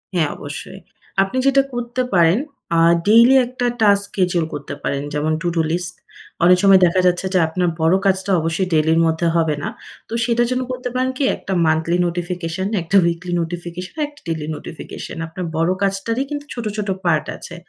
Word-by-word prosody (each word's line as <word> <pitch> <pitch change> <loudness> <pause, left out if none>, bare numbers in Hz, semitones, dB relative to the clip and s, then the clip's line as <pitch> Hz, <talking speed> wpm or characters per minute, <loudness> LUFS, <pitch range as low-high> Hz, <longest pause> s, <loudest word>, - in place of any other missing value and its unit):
হ্যাঁ, 160 -4 +2
অবশ্যই। 150 +6 -8 0.4
আপনি 195 +7 -4
যেটা 275 0 +5
করতে 240 +1 -2
পারেন, 175 +2 +4 0.4
আ - - +4 0.3
ডেইলি 235 +5 +7
একটা 245 0 -4 0.2
টাস্ক 200 -1 +4
স্কেডিউল 180 -4 0
করতে 145 -1 -6
পারেন। 140 0 -1
যেমন 150 +1 0
to-do 170 -2 0
list 175 +1 -3 0.5
অনেক 180 +1 +6
সময় 195 -1 +7
দেখা 180 +2 +2
যাচ্ছে 180 +1 +1
যে 185 - +4
আপনার 175 +2 0
বড় 165 +3 +4
কাজটা 195 0 +1
অবশ্যই 165 +4 -1
ডেইলির 160 +1 +3
মধ্যে 160 +1 +1
হবে 160 -3 +2
না। - - -2 0.4
তো - - -7
সেটার 240 0 +1
জন্য 255 - 0
করতে 250 0 -4
পারেন 255 +1 +1
কি, - - 0
একটা 190 - -5
মান্থলি 160 +2 +1
নোটিফিকেশন, 175 +1 -3
একটা 170 +4 -2
উইকলি 170 +1 -2
নোটিফিকেশন, 175 - -6
একটা 290 0 -18
ডেইলি 160 -2 -3
নোটিফিকেশন। 160 - -8
আপনার 180 +2 -6
বড় 165 +2 +2
কাজটারই 200 +6 0
কিন্তু 290 0 -5
ছোট, 235 -2 -5
ছোট 205 -1 -3 0.2
পার্ট 155 -3 +2
আছে। - - -10
180 Hz, 175 wpm, -20 LUFS, 165-210 Hz, 0.5 s, ডেইলি